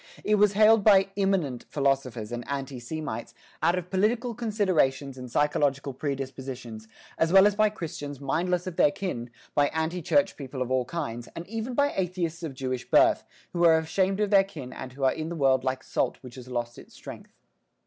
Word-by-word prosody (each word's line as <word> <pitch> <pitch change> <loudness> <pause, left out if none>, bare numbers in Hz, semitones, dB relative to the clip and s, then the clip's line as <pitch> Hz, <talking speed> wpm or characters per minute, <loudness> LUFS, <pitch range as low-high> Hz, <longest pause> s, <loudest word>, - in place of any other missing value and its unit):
It 210 - +1
was 210 -1 +4
hailed 215 +1 +5
by 195 -2 +6
"immanent" 190 -11 0
philosophers 135 -6 -1
and 120 0 -4
anti 135 -2 -4
Semites 120 -2 -5 0.3
out 175 - +3
of 180 0 -5
political 230 +5 +1
considerations 185 - 0
and 125 -1 -8
psychological 140 0 +1
predispositions, 130 -5 -5 0.3
as 165 0 +2
well 190 +1 +8
as 205 - +4
by 215 +1 +3
Christians 155 -8 -6
mindless 175 +6 -1
of 185 -3 -6
their - - +5
kin, 135 -9 -4 0.2
by 145 -1 +3
anti 160 +3 -2
church 285 - +2
people 130 -2 -4
of 125 - -7
all 130 -1 +1
kinds, 120 -7 -5
and 170 - -7
even 225 +4 -4
by 285 +2 +2
atheists 175 -3 -2
of 155 -5 -5
Jewish 130 -1 -4
birth, - - +4 0.3
who 175 -1 0
are 165 -1 +7
ashamed 190 +5 0
of 210 -1 0
their 195 -1 +7
kin 150 -10 -9
and 130 - -7
who 135 +1 -6
are 130 - +4
in 160 0 -4
the 170 - -4
world 135 -4 +3
like 130 0 -2
salt - - -1
which 125 -2 -11
has 125 -1 -10
lost 120 -1 -4
its - - -15
strength. - - -11
155 Hz, 195 wpm, -27 LUFS, 130-190 Hz, 0.3 s, well